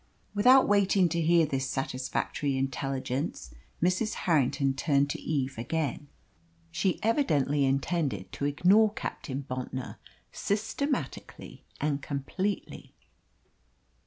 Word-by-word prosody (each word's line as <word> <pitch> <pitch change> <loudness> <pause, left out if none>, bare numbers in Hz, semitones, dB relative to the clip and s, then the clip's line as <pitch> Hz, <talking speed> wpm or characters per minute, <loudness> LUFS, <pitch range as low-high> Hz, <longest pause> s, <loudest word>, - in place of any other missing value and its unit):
Without 250 +6 +6
waiting 200 -2 +4
to 170 +1 -1
hear 165 0 +4
this 135 -2 -2
satisfactory 135 +1 -2
intelligence, 135 - -3 0.3
Mrs. 185 +5 +1
Harrington 140 -4 +2
turned 140 0 +1
to - - -5
Eve 135 -5 -2
again. 145 +2 -2 0.6
She 185 +2 0
evidently 150 - +2
intended 135 - -1
to 140 - -3
ignore 190 +9 +4
Captain 135 -9 -5
Bontnor 130 0 -5 0.3
systematically 220 +8 -3
and 145 -1 -1
completely. 150 +9 -4
145 Hz, 100 wpm, -29 LUFS, 135-185 Hz, 0.6 s, Without